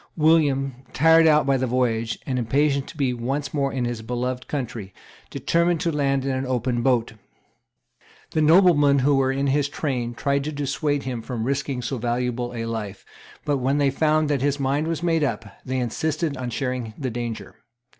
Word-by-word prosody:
William, 140 -5 +2
tired 165 +1 +5
out 150 -2 +4
by 135 -1 +2
the 130 0 -1
voyage, 115 -2 0
and 130 -2 -1
impatient 140 +4 +1
to - - -11
be 135 -4 +1
once 135 +4 -3
more 140 -2 0
in 130 -2 -2
his 120 -2 -3
beloved 125 +2 -3
country, 115 -9 -5 0.3
determined 170 +5 +1
to 170 0 0
land 140 -3 0
in 135 - 0
an 130 0 -1
open 125 -1 -1
boat. 120 -3 +1 1.2
The 155 - +1
noblemen 155 -3 +5
who 140 +2 +3
were 135 -1 +2
in 135 +1 -1
his 140 +1 +1
train 125 -6 -3
tried 140 +1 0
to 155 - -2
dissuade 145 0 -1
him 125 -3 -4
from 115 -1 -4
risking 135 0 -2
so 130 +1 -3
valuable 120 +1 -2
a 115 -1 -3
life; 105 -4 -5 0.4
but, 145 -1 +1
when 135 +2 0
they 140 -2 +2
found 155 +2 +2
that 145 -3 0
his 145 +1 0
mind 140 +3 0
was 165 0 -3
made 165 -2 +2
up, 115 -5 -2 0.2
they 130 0 -3
insisted 150 +5 -1
on 125 -1 -4
sharing 125 -3 -3
the 130 -4 -3
danger. 120 -1 -5
135 Hz, 185 wpm, -23 LUFS, 125-145 Hz, 1.2 s, tired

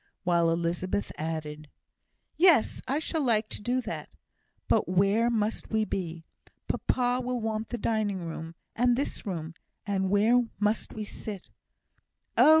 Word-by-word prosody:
while 170 -2 +3
Elizabeth 170 +4 -1
added, 155 -1 -4 0.7
"Yes! 330 -9 +4
I 270 +3 +1
shall 320 +1 -1
like 220 -5 +2
to - - -7
do 245 +4 0
that. - - -5 0.6
But - - +2
where 200 +5 +3
must 220 -2 -1
we 220 -1 +1
be? 170 -5 -4 0.4
Papa 250 0 +1
will 250 0 -1
want 220 -1 -2
the 240 - -4
dining 210 -6 -1
room 165 0 -6 0.2
and 245 +1 +3
this 270 -4 -3
room, 165 -4 -4 0.3
and 190 -2 0
where 220 +5 +5 0.2
must 210 +1 0
we 215 - -4
sit?" 205 -2 -8 0.8
"Oh!" - - +7
210 Hz, 145 wpm, -28 LUFS, 175-240 Hz, 0.8 s, Oh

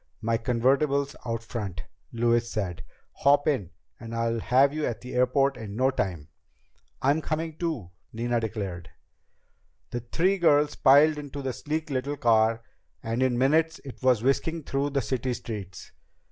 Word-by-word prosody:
"My 115 +1 0
convertible's 135 +4 +1
out 115 -1 -2
front," 100 - -5 0.3
Louise 120 0 +1
said. 90 -6 -3 0.3
"Hop 145 +1 +4
in 130 - 0 0.3
and 115 0 -7
I'll 115 0 0
have 130 +6 +3
you 155 0 -3
at 120 - -4
the 125 - -8
airport 130 +2 +2
in 105 -3 -7
no 130 +3 +2
time." 85 - -3 0.7
"I'm 145 +4 +3
coming 160 0 -3
too," 155 - -3 0.2
Nina 120 +1 -1
declared. 100 -7 -5 1.0
The 120 - -2
three 180 +11 0
girls 150 -3 +4
piled 150 +3 +5
into 145 -1 -7
the 130 -1 -2
sleek 155 +5 -4
little 140 +2 -2
car, 115 -3 +3 0.4
and 115 +2 -2
in 130 -2 +2
minutes 160 +5 +2
it 135 - -10
was 125 -4 +3
whisking 160 +5 0
through 140 +1 -1
the 140 -2 -1
city 130 0 -2
streets. 100 -6 -7
125 Hz, 155 wpm, -27 LUFS, 115-145 Hz, 1.0 s, piled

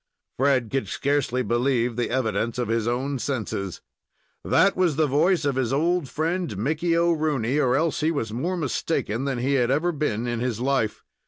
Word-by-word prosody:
Fred 130 -4 +1
could 135 0 -1
scarcely 135 -3 0
believe 120 -1 +1
the 120 0 -1
evidence 115 -2 -1
of 125 -3 -2
his 115 0 0
own 130 +3 -1
senses. 110 -7 -3 0.6
That 200 - +3
was 180 -5 +2
the 155 +1 +3
voice 160 +4 +2
of 140 -2 0
his 125 -3 0
old 165 +1 +1
friend, 160 - -2
Mickey 160 - 0
O'Rooney, 155 -6 +1
or 130 -3 +2
else 160 +2 +1
he 155 - +1
was 115 -9 -2
more 175 +10 -2
mistaken 135 -5 -1
than 135 -2 -1
he 130 +3 0
had 125 -3 +2
ever 155 +6 +1
been 130 -8 -2
in 120 -1 -2
his 120 -2 -2
life. 130 -4 0
135 Hz, 180 wpm, -24 LUFS, 120-155 Hz, 0.6 s, That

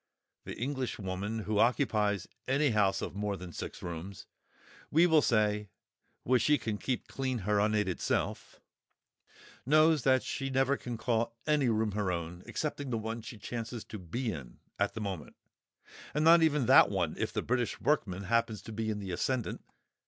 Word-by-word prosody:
The - - -6
Englishwoman 110 -5 -3
who 105 0 0
occupies 105 -5 +2 0.2
any 140 +1 +2
house 105 -3 +2
of - - -4
more 100 0 -2
than 90 -1 -9
six - - -7
rooms, 85 +3 -6 0.6
we 165 +3 +5
will 160 -3 +5
say 105 -4 +1 0.5
(which 125 0 +3
she 150 -1 +4
can 110 -5 -3
keep 130 -2 -2
clean 130 -2 -2
her 105 0 +2
unaided 105 -3 +1
self), - - -2 1.0
knows 155 +2 +4
that 130 0 +3
she 135 -1 -3
never 135 +1 +2
can 120 -3 -6
call 115 0 -1
any 150 -4 +2
room 110 -1 +1
her 100 -2 -1
own, 85 0 -4
excepting 145 -3 -3
the 115 - 0
one 110 +1 -4
she 110 +1 -9
chances 115 +2 -5
to 105 - -8
be 110 +7 -3
in 70 -9 -8 0.2
at - - 0
the 110 - -4
moment—and 100 - -7
not 165 +1 +8
even 150 -5 +3
that 130 -4 +7
one 90 -6 0
if - - -1
the - - -2
British 125 -1 -1
workman 100 -11 0
happens 115 -1 0
to - - -8
be 110 0 -2
in 105 - -1
the 100 -2 -5
ascendant! 125 +7 -2
110 Hz, 170 wpm, -31 LUFS, 100-130 Hz, 1.0 s, not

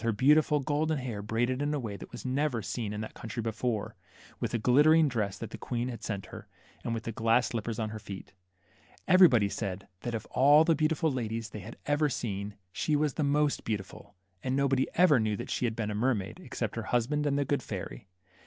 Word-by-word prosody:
23 115 -2 0
beautiful 150 +5 +4
golden 155 +3 0
hair 120 -6 -4
braided 120 +5 0
in 145 +1 0
a - - -1
way 110 -5 -4
that - - -10
was - - -9
never 130 -3 0
seen 110 +1 -3
in 105 0 -4
that 110 - -6
country 115 +1 -7
before; 110 0 -2 0.4
with - - -1
the 120 - -1
glitter 145 +8 +5
ing 160 -2 +5
dress 110 -7 -1
that - - -7
the - - -8
Queen 120 +1 -2
had 115 -3 -7
sent 100 -3 -3
her; - - -10 0.4
and 115 - -2
with 115 - -4
the 115 - -3
glass 115 +2 +2
slippers 115 -1 -3
on 110 -2 -2
her 110 - -6
feet. 100 -3 -9 0.7
Everybody 175 - +6
said 100 -2 -4
that 120 +2 -3
of 110 - -4
all 145 +4 +6
the 165 0 +3
beautiful 155 0 +1
ladies 115 -3 -3
they 105 - -6
had 110 +5 -10
ever 145 +1 +2
seen, 100 -5 -4 0.2
she 150 - 0
was 150 -2 +1
the 155 - -1
most 145 0 +1
beautiful; 105 -1 -5 0.3
and 130 0 -1
nobody 135 -1 +2
ever 175 -7 +6
knew 110 -2 0
that - - -6
she - - 0
had 115 -2 -1
been 110 -2 -2
a - - -2
mermaid, 105 -3 -1
except - - -4
her - - -2
husband 145 +5 +1
and 140 -1 +1
the 140 - +1
good 140 -2 0
fairy. 100 -2 -7
120 Hz, 225 wpm, -30 LUFS, 110-145 Hz, 0.7 s, Everybody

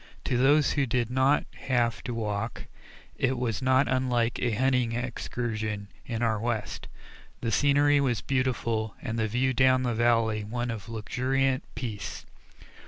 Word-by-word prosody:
To 125 - -1
those 140 +4 +4
who 140 -2 +1
did 120 0 0
not 130 +3 +3 0.2
have 120 -3 +1
to 125 - -3
walk, 105 -3 -3 0.5
it 130 0 +1
was 120 -3 -2
not 130 +1 +3
unlike 125 -2 +1
a 125 - +1
hunting 125 0 +1
excursion 110 -4 -3 0.2
in 115 -1 -2
our 110 -2 +1
West; 115 -1 -3 0.5
the 115 - -1
scenery 145 +3 +4
was 125 -6 0
beautiful 115 -5 -1
and 115 -2 -3
the 110 - +1
view 125 +4 +1
down 130 0 +4
the 120 -2 0
valley 115 -2 +2
one 120 +3 -3
of 115 0 -7
luxuriant 130 +4 0
peace. 110 -5 -5
120 Hz, 150 wpm, -28 LUFS, 115-130 Hz, 0.5 s, those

